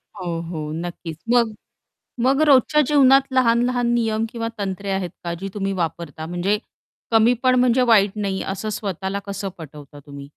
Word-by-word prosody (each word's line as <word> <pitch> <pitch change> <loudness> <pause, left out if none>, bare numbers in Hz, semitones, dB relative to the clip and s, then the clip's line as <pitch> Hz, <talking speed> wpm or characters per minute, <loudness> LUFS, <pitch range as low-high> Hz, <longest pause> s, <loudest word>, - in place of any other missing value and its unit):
हो, - - -7 0.2
हो 155 -3 -5
नक्कीच. 170 -1 -6 0.2
मग 230 -3 +3 0.7
मग 270 +3 +3
रोजच्या 290 +2 +5
जीवनात 275 -1 +5
लहान-लहान 245 -1 +2
नियम, 225 -1 0
किंवा 230 -1 -4
तंत्रे 195 0 -4
आहेत 190 -2 -2
का 170 0 -2
जी 195 - -4
तुम्ही 195 -1 -2
वापरता? 165 -3 -4
म्हणजे 175 +5 0 0.5
कमी 230 +2 +4
पण 255 -1 +4
म्हणजे 250 0 +3
वाईट 200 -2 +4
नाही 195 -2 -2
असं 205 +3 -5
स्वतःला 195 0 -3
कसं 200 0 -4
पटवता 145 -2 -11
तुम्ही? 140 -1 -9
200 Hz, 155 wpm, -21 LUFS, 175-240 Hz, 0.7 s, रोजच्या